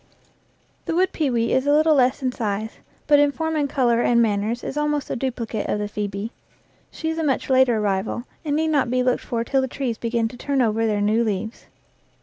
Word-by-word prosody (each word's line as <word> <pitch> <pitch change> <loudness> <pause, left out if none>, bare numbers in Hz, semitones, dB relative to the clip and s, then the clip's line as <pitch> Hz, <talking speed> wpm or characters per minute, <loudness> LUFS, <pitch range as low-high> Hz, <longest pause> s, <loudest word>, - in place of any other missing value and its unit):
The 330 - -2
wood 370 +2 +2
pewee 245 -7 0
is 260 +2 +1
a - - +4
little 310 +1 +4
less 265 0 +2
in 255 - +1
size, 220 -2 -3 0.3
but 290 -1 +5
in 290 0 +4
form 320 +2 -2
and 290 -2 0
color 240 -4 +2
and 240 -1 +3
manners 220 +1 0
is - - -5
almost 295 -1 -1
the - - -2
duplicate 235 -4 -3
of 210 0 -2
phoebe. 205 +1 -4 0.6
She 320 - -4
is 320 - -4
a - - 0
much 270 -2 0
later 260 -3 +4
arrival, 205 +2 -1 0.2
and 295 -2 -1
need 320 +1 +1
not 285 -5 +2
be 250 +1 +1
looked 250 0 +1
for 230 -1 -2
till 270 +3 +1
the 265 - -1
trees 250 -3 -3
begin 230 -1 0
to 245 - -11
turn 280 +2 -1
over 225 -2 +2
their 210 -1 0
new 215 +3 +2
leaves. 220 +1 -4
245 Hz, 215 wpm, -22 LUFS, 220-285 Hz, 0.6 s, but